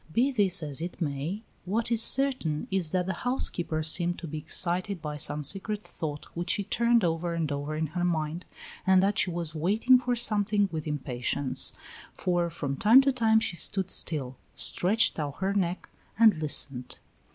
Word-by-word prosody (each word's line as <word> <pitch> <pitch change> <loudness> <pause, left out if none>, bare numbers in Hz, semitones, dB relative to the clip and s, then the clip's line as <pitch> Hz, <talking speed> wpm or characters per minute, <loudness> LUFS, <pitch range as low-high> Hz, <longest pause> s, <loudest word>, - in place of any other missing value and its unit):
Be 250 - +2
this 200 -9 +1
as 145 0 -2
it 175 +2 -6
may, 160 +6 -3 0.2
what 220 +6 -2
is 230 -1 +3
certain 255 - +1
is 190 -4 +2
that 180 +2 0
the 190 - -2
housekeeper 175 -10 -1
seemed 175 +2 +2
to - - -7
be 155 0 -5
excited 180 +4 -1
by 150 -2 -5
some 150 +1 -2
secret 205 +7 -3
thought 150 -2 -6
which 175 +1 -4
she 210 -5 +1
turned 235 +2 +2
over 170 0 -1
and 160 -3 -2
over 145 +2 -3
in 160 +1 -1
her 175 +4 -4
mind, 165 0 -2 0.4
and 190 0 +5
that 200 +1 +2
she - - +2
was 170 -2 -4
waiting 215 +11 +3
for 245 0 -1
something 210 -3 +2
with 155 -1 -5
impatience, 130 -2 0 0.4
for 175 -1 -1
from 140 -4 -4
time 230 +6 +7
to 275 0 +2
time 225 -3 +3
she 220 -5 -2
stood 190 0 -1
still, 130 -5 -1 0.2
stretched 205 0 +2
out 145 -2 -4
her 195 +1 -1
neck, 185 -2 -2 0.3
and 220 -8 +5
listened. 135 -4 0
175 Hz, 180 wpm, -28 LUFS, 155-210 Hz, 0.4 s, time